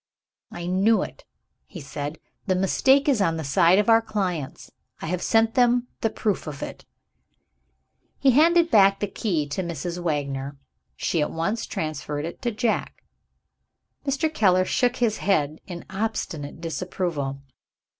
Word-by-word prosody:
"I 175 Hz, -, -6 dB
knew 195 Hz, +5 st, +3 dB
it!" -, -, -10 dB, 0.4 s
he 180 Hz, -, -9 dB
said. 145 Hz, +1 st, -5 dB, 0.3 s
"The 185 Hz, -, +2 dB
mistake 265 Hz, -, +3 dB
is 260 Hz, -7 st, +3 dB
on 165 Hz, -4 st, +1 dB
the 160 Hz, -, -4 dB
side 165 Hz, +6 st, +4 dB
of 210 Hz, -, +2 dB
our 225 Hz, 0 st, +6 dB
clients; 180 Hz, -10 st, -3 dB, 0.3 s
I -, -, -6 dB
have 180 Hz, +2 st, -2 dB
sent 225 Hz, 0 st, +3 dB
them 245 Hz, 0 st, +3 dB
the 225 Hz, -, +1 dB
proof 210 Hz, -5 st, -2 dB
of 145 Hz, -2 st, -6 dB
it." -, -, -8 dB, 1.3 s
He 270 Hz, -, +4 dB
handed 335 Hz, +5 st, +4 dB
back 195 Hz, -2 st, +5 dB
the -, -, 0 dB
key 185 Hz, -6 st, -2 dB
to 150 Hz, -, -2 dB
Mrs. 170 Hz, 0 st, -4 dB
Wagner. 140 Hz, -4 st, -2 dB, 0.4 s
She 165 Hz, -, 0 dB
at 150 Hz, -, 0 dB
once 195 Hz, +8 st, -2 dB
transferred 155 Hz, -4 st, -3 dB
it 170 Hz, -, -7 dB
to 245 Hz, -, 0 dB
Jack. 230 Hz, 0 st, -2 dB, 1.0 s
Mr. 300 Hz, +3 st, 0 dB
Keller 185 Hz, -7 st, +3 dB
shook 245 Hz, +5 st, +1 dB
his 230 Hz, -4 st, +1 dB
head 155 Hz, -6 st, 0 dB
in 175 Hz, -3 st, -7 dB
obstinate 190 Hz, -8 st, -4 dB
disapproval. 165 Hz, -5 st, -3 dB
185 Hz, 150 wpm, -24 LUFS, 160-225 Hz, 1.3 s, our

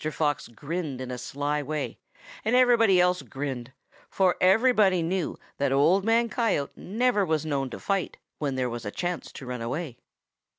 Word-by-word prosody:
Fox 145 Hz, -3 st, -1 dB
grinned 145 Hz, +3 st, -5 dB
in 130 Hz, -1 st, -5 dB
a 125 Hz, -, -4 dB
sly 145 Hz, +4 st, -2 dB
way, 145 Hz, 0 st, -4 dB, 0.4 s
and 225 Hz, +3 st, +2 dB
everybody 235 Hz, -6 st, +5 dB
else 180 Hz, 0 st, +3 dB
grinned, 130 Hz, -3 st, -5 dB, 0.4 s
for 185 Hz, -2 st, +2 dB
everybody 195 Hz, -2 st, +4 dB
knew 175 Hz, 0 st, -2 dB, 0.2 s
that 140 Hz, -1 st, +1 dB
Old 160 Hz, +8 st, +4 dB
Man 230 Hz, +2 st, +3 dB
Coyote 220 Hz, -, 0 dB
never 225 Hz, +1 st, +1 dB
was 160 Hz, -3 st, 0 dB
known 140 Hz, -3 st, -1 dB
to -, -, -7 dB
fight 195 Hz, -3 st, -1 dB, 0.2 s
when 140 Hz, -3 st, -1 dB
there 130 Hz, -1 st, 0 dB
was 120 Hz, -1 st, -5 dB
a 105 Hz, -, -3 dB
chance 175 Hz, -, -4 dB
to 135 Hz, -, -9 dB
run 125 Hz, -1 st, -5 dB
away. 130 Hz, +2 st, -4 dB
160 Hz, 170 wpm, -27 LUFS, 135-195 Hz, 0.4 s, everybody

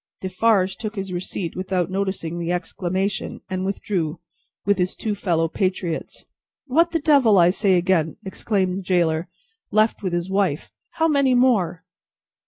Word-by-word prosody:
Defarge 190 Hz, 0 st, +1 dB
took 215 Hz, -1 st, -5 dB
his 195 Hz, -2 st, -4 dB
receipt 175 Hz, -1 st, -4 dB
without 185 Hz, -1 st, -1 dB
noticing 190 Hz, -4 st, -2 dB
the 170 Hz, 0 st, -2 dB
exclamation, 185 Hz, +2 st, -2 dB
and 185 Hz, 0 st, -2 dB
withdrew, 190 Hz, -5 st, -2 dB, 0.5 s
with 205 Hz, -1 st, +2 dB
his 180 Hz, 0 st, 0 dB
two 215 Hz, -, -2 dB
fellow 170 Hz, -5 st, 0 dB
patriots. 185 Hz, -1 st, -3 dB, 0.4 s
"What 325 Hz, +5 st, +3 dB
the 335 Hz, -, 0 dB
Devil, 280 Hz, -9 st, +4 dB
I 175 Hz, 0 st, +6 dB
say 195 Hz, -1 st, +2 dB
again!" 175 Hz, -3 st, +1 dB
exclaimed 190 Hz, -1 st, -1 dB
the 190 Hz, -, -3 dB
gaoler, 170 Hz, -3 st, +1 dB, 0.4 s
left 215 Hz, +2 st, +2 dB
with 185 Hz, -4 st, -2 dB
his 175 Hz, 0 st, -1 dB
wife. 190 Hz, -6 st, 0 dB, 0.2 s
"How 325 Hz, 0 st, +2 dB
many 280 Hz, -4 st, +3 dB
more!" 200 Hz, -9 st, +2 dB
190 Hz, 150 wpm, -22 LUFS, 175-210 Hz, 0.5 s, I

